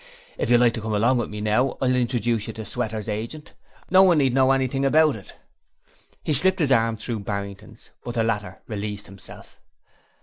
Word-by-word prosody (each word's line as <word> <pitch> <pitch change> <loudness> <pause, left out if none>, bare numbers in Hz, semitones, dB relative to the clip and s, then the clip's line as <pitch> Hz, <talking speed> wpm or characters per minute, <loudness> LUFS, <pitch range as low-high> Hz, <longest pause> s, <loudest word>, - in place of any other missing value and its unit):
If - - -3
you 120 - +6
like 120 -1 +4
to 115 - -4
come 110 0 -2
along 120 +4 +2
with - - -3
me 105 0 -6
now, 110 +5 +1
I'll 130 -1 +1
introduce 120 -3 0
you - - -5
to 110 -1 -7
Sweater's 110 -3 -4
agent 115 +8 -5 0.4
no 185 0 +7
one 180 -4 +5
need 135 -4 +2
know 130 0 +4
anything 135 0 0
about 155 +1 +4
it.' 100 - -12 0.9
He 155 - 0
slipped 190 +7 +3
his 150 -5 +1
arm 115 -2 +2
through 110 +1 -4
Barrington's, 100 +2 -7
but 120 - -6
the 115 - +1
latter 105 -4 -3
released 105 -2 -5
himself. 95 0 -13
115 Hz, 195 wpm, -23 LUFS, 105-130 Hz, 0.9 s, no